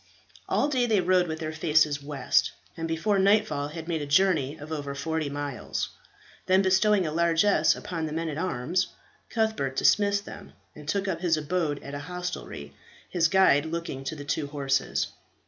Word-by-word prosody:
All - - +2
day 255 -4 +1
they 215 -3 +3
rode 180 0 +3
with 160 -1 -3
their 160 0 -4
faces 155 -2 +2
west, 140 -1 +1 0.2
and 165 0 -4
before 180 +5 +1
nightfall 200 -7 +2
had 160 +2 -8
made 165 -3 -1
a 145 - -4
journey 155 -3 +2
of 150 +2 -10
over 145 -3 -4
forty 160 +1 -2
miles. 145 -2 -4 0.6
Then 190 +1 +4
bestowing 190 +1 +3
a 155 - -2
largess 165 0 +3
upon 165 -3 -4
the - - -6
men 165 +2 -2
at 155 -1 -4
arms, 180 +2 0 0.4
Cuthbert 220 - -1
dismissed 200 +3 +3
them, - - -10 0.2
and 150 -1 -12
took 200 +4 -1
up 170 -3 -2
his 170 -3 +2
abode 155 -1 -1
at 140 - -8
a 145 - -4
hostelry, 180 - -6 0.4
his 170 -3 +3
guide 165 -5 +4
looking 165 -5 -4
to 155 - -3
the 145 -1 -8
two 150 0 -1
horses. 140 -2 0
160 Hz, 180 wpm, -27 LUFS, 145-185 Hz, 0.6 s, Then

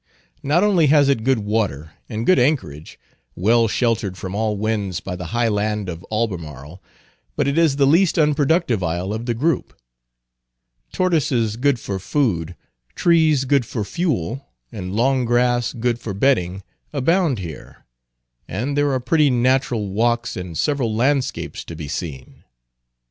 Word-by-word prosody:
Not 155 +7 +2
only 185 -7 +4
has 145 -1 +4
it 130 -5 +1
good 135 +1 +2
water, 100 -8 -2 0.2
and 110 0 -3
good 185 - +5
anchorage, 120 - -1 0.4
well 115 +5 +3
sheltered 110 -5 0
from 95 0 -6
all 105 0 -1
winds 105 -4 -2
by 90 - -6
the 90 -1 -6
high 120 +4 0
land 105 -2 -1
of 85 0 -7
Albemarle, 85 - -4 0.5
but - - 0
it 140 - 0
is 165 -4 +3
the 140 -1 +3
least 165 +6 +3
unproductive 150 - +2
isle 90 +4 -2
of 115 +2 -5
the 120 - 0
group. 150 +4 -1 1.1
Tortoises 135 - +1
good 130 +1 +1
for 100 -3 -4
food, 95 - -1 0.4
trees 160 -5 +3
good 140 0 +3
for 110 -1 -4
fuel, 135 - -2 0.2
and 95 -4 -6
long 130 +3 +2
grass 120 0 +1
good 120 0 -1
for 105 -5 -5
bedding, 95 -6 +1 0.3
abound 155 0 +1
here, 85 -5 -9 0.6
and 140 +6 -3
there 145 0 +2
are 130 - +1
pretty 145 +4 +2
natural 125 -4 +1
walks, 120 +3 0
and 90 -3 -6
several 135 -7 0
landscapes 135 +3 -1
to 85 - -9
be 80 -2 -7
seen. 70 -4 -7
120 Hz, 150 wpm, -21 LUFS, 100-140 Hz, 1.1 s, good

